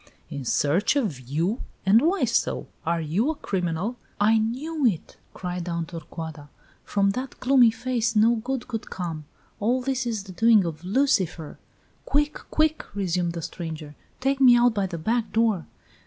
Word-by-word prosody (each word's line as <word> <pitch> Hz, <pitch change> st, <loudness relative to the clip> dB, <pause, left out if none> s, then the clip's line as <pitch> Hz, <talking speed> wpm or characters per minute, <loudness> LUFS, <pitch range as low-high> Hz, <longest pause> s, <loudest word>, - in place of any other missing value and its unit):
"In 140 Hz, -3 st, -5 dB
search 155 Hz, -, +2 dB
of 210 Hz, -, 0 dB
you? 160 Hz, -, -1 dB, 0.2 s
And 210 Hz, +4 st, +6 dB
why 350 Hz, +7 st, +2 dB
so? -, -, 0 dB, 0.2 s
Are 170 Hz, 0 st, +1 dB
you 175 Hz, -, 0 dB
a 320 Hz, -, -1 dB
criminal?" 190 Hz, -, -2 dB, 0.2 s
"I 220 Hz, +2 st, +4 dB
knew 280 Hz, +8 st, -2 dB
it!" 205 Hz, -10 st, 0 dB, 0.2 s
cried 180 Hz, -1 st, -4 dB
Aunt 170 Hz, -1 st, -3 dB
Torcuata. 160 Hz, -3 st, -8 dB, 0.3 s
"From 200 Hz, -1 st, +1 dB
that 255 Hz, +5 st, -5 dB
gloomy 255 Hz, -2 st, +5 dB
face 235 Hz, 0 st, -1 dB
no 225 Hz, +3 st, +5 dB
good 250 Hz, +2 st, -3 dB
could 225 Hz, -3 st, -5 dB
come. 165 Hz, -4 st, -5 dB, 0.3 s
All 240 Hz, +5 st, +2 dB
this 260 Hz, -1 st, -1 dB
is 220 Hz, -4 st, -2 dB
the 195 Hz, -, -10 dB
doing 220 Hz, 0 st, +4 dB
of 160 Hz, -1 st, -5 dB
Lucifer!" 190 Hz, -, 0 dB, 0.5 s
"Quick! 295 Hz, +1 st, +1 dB
quick!" 310 Hz, 0 st, +1 dB
resumed 180 Hz, -3 st, 0 dB
the 170 Hz, -1 st, -5 dB
stranger. 160 Hz, -3 st, -6 dB, 0.3 s
Take 270 Hz, +1 st, 0 dB
me 245 Hz, -2 st, +8 dB
out 240 Hz, -1 st, +4 dB
by 200 Hz, -3 st, 0 dB
the 175 Hz, -2 st, -5 dB
back 225 Hz, +7 st, -1 dB
door!" 220 Hz, -7 st, +1 dB
210 Hz, 165 wpm, -25 LUFS, 170-245 Hz, 0.5 s, me